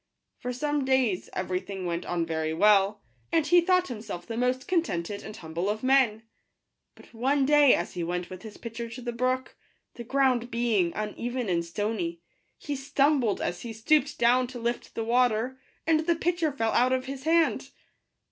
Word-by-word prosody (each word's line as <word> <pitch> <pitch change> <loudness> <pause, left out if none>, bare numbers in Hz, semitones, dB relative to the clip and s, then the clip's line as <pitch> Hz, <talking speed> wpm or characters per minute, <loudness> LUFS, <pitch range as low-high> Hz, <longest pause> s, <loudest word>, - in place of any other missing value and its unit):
For 250 - -4
some 290 +3 -1
days 260 -8 +1
every 185 0 -1
thing 190 -1 -7
went 170 0 -3
on 170 -1 -1
very 160 -1 -2
well, 205 +2 +4 0.3
and 325 -2 +2
he 350 +2 +5
thought 365 0 +2
himself 210 -7 -6
the 230 - -5
most 250 +2 0
contented 205 - -1
and 215 0 -9
humble 165 +4 -3
of 215 +2 -3
men; 255 -5 +3 0.7
but - - -18
one 265 +4 +1
day, 295 -1 +6
as - - -3
he 175 -3 -3
went 175 +1 -3
with 185 -1 -9
his 220 -2 -10
pitcher 230 0 -6
to 240 +2 -8
the 240 - -2
brook, 255 +2 -1 0.4
the 240 - -8
ground 255 -1 +1
being 230 -7 +1
uneven 235 +2 -3
and 170 -2 +1
stony, 170 -1 -3 0.4
he 290 - -4
stumbled 270 -4 +1
as 175 - -3
he 235 -2 -6
stooped 285 +6 +2
down 245 +2 +3
to 250 0 -8
lift 235 +1 -3
the 225 - -2
water, 245 +1 +1 0.3
and 320 -1 +3
the 335 +2 +1
pitcher 340 -1 0
fell 225 -5 -1
out 255 +2 +3
of 260 0 -1
his 270 +1 -7
hand. 330 0 +2
240 Hz, 185 wpm, -27 LUFS, 205-270 Hz, 0.7 s, day